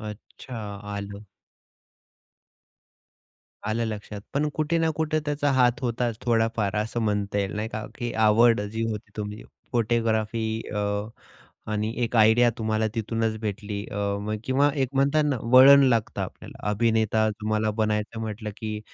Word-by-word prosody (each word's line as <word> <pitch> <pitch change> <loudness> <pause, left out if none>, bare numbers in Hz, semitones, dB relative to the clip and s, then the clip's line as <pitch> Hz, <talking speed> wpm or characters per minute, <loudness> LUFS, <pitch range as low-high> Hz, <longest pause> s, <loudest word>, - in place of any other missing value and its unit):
अच्छा, 110 +3 -9 0.4
आलं 100 0 -6 2.5
आलं 115 +1 0
लक्षात, 105 -1 -6
पण 150 +2 +1
कुठे 155 +2 0
ना 165 - +2
कुठे 155 0 0
त्याचा 145 0 0
हात 125 +1 +3
होताच 120 -2 -1
थोडाफार 115 -3 +1
असं 110 +3 -1
म्हणता 105 -2 0
येईल, 100 -1 -1
नाही 110 +1 -2
का. 110 -1 -5
की 120 -2 -4
आवड 115 +1 +5
जी 105 +2 -4
होती 105 -1 -6
तुमची 105 0 -5 0.3
फोटोग्राफी 115 -1 +1 0.3
अ, 105 - -1 0.9
आणि 105 +1 -1
एक 120 - -2
आयडिया 110 +2 +6
तुम्हाला 110 0 0
तिथूनच 110 0 -1
भेटली 105 -1 -4
अ, 100 +1 -2
किंवा 135 +3 +3
एक 135 -3 0
म्हणतात 140 +3 +3
ना, 145 -3 +1
वळण 130 +4 +8
लागतं 115 -3 0
आपल्याला. - - -7
अभिनेता 110 0 +2
तुम्हाला 110 0 0
बनायचं 105 +1 -1
म्हटलं, 110 -1 -4
की 110 -1 -4
110 Hz, 135 wpm, -25 LUFS, 105-120 Hz, 2.5 s, वळण